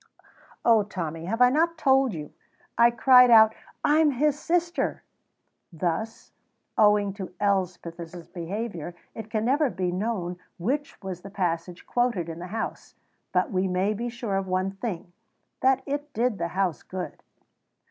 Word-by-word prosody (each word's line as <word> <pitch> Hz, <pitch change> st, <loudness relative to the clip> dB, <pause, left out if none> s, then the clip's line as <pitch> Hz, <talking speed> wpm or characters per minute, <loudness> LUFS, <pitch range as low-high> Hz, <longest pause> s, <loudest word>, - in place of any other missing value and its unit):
"Oh, 230 Hz, -2 st, +6 dB
Tommy, 165 Hz, -5 st, -5 dB
have 225 Hz, +6 st, +2 dB
I 250 Hz, -, +6 dB
not 330 Hz, +4 st, +2 dB
told 270 Hz, -4 st, +3 dB
you? 150 Hz, -2 st, -7 dB, 0.4 s
I 235 Hz, +1 st, +6 dB
cried 250 Hz, +1 st, +6 dB
out, 220 Hz, -1 st, +8 dB, 0.3 s
'I'm 305 Hz, +1 st, +5 dB
his 290 Hz, +2 st, +1 dB
sister.'" 345 Hz, 0 st, -1 dB, 0.7 s
Thus, 180 Hz, +7 st, -3 dB, 0.4 s
owing 210 Hz, -2 st, +4 dB
to 190 Hz, -2 st, -8 dB
Elspeth's 180 Hz, -4 st, -2 dB
behaviour, 175 Hz, -1 st, -5 dB, 0.2 s
it 220 Hz, -1 st, -8 dB
can 215 Hz, 0 st, -1 dB
never 280 Hz, +3 st, +3 dB
be 185 Hz, -5 st, -2 dB
known 180 Hz, -2 st, -2 dB, 0.2 s
which 275 Hz, +11 st, -2 dB
was 185 Hz, -2 st, -5 dB
the 195 Hz, -, -9 dB
passage 175 Hz, -2 st, -3 dB
quoted 235 Hz, -9 st, 0 dB
in 165 Hz, 0 st, -6 dB
the 180 Hz, -, -6 dB
House; 220 Hz, +4 st, -5 dB, 0.4 s
but 275 Hz, -, +1 dB
we 190 Hz, -1 st, +1 dB
may 185 Hz, +3 st, +1 dB
be 235 Hz, +3 st, -3 dB
sure 230 Hz, -4 st, -3 dB
of 195 Hz, -1 st, -2 dB
one 185 Hz, +1 st, 0 dB
thing 195 Hz, -4 st, -6 dB, 0.5 s
that 265 Hz, 0 st, +3 dB
it 290 Hz, +1 st, -4 dB
did 235 Hz, -2 st, 0 dB
the 170 Hz, -, 0 dB
House 185 Hz, -6 st, 0 dB
good. 185 Hz, -1 st, -7 dB
205 Hz, 150 wpm, -26 LUFS, 180-245 Hz, 0.7 s, out